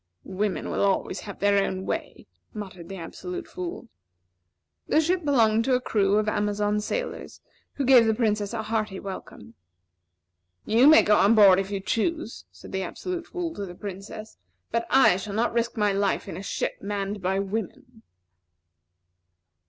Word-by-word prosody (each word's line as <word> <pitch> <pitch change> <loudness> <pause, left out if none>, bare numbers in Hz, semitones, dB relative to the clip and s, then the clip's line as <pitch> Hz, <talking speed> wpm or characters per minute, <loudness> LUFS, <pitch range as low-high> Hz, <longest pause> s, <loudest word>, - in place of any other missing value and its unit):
"Women 195 +1 -2
will - - -1
always 195 -1 0
have 200 - -8
their 200 0 +3
own 190 0 -3
way," - - -4 0.3
muttered 185 -5 -8
the 195 - -6
Absolute 360 - -7
Fool. 360 -6 -6 1.0
The - - +3
ship 350 +3 +1
belonged 230 -6 +3
to 260 - +3
a - - +2
crew 205 -4 +1
of 215 0 +1
Amazon 210 0 0
sailors, - - -4 0.3
who 280 - -2
gave 245 -3 +7
the 220 - +2
Princess 210 -3 0
a 230 -2 -3
hearty 215 -3 -2
welcome. 150 - -9 1.1
"You 235 +5 +5
may 315 +1 +8
go 210 - +4
on 210 +3 +5
board 195 -3 +7
if 195 0 -3
you 200 -1 -2
choose," 240 - -2
said - - -13
the 190 - -2
Absolute 350 - -5
Fool 350 -3 -4
to 205 - -6
the 175 - -9
Princess, 200 +2 -8 0.3
"but 230 0 -1
I 265 -9 +5
shall 200 +1 -6
not 230 +2 +1
risk 235 +1 -1
my 210 -2 +2
life 200 0 0
in - - -6
a 185 - -6
ship 200 - -3
manned 200 0 -3
by 190 +1 0
women." 225 +5 -5
210 Hz, 170 wpm, -25 LUFS, 195-245 Hz, 1.1 s, may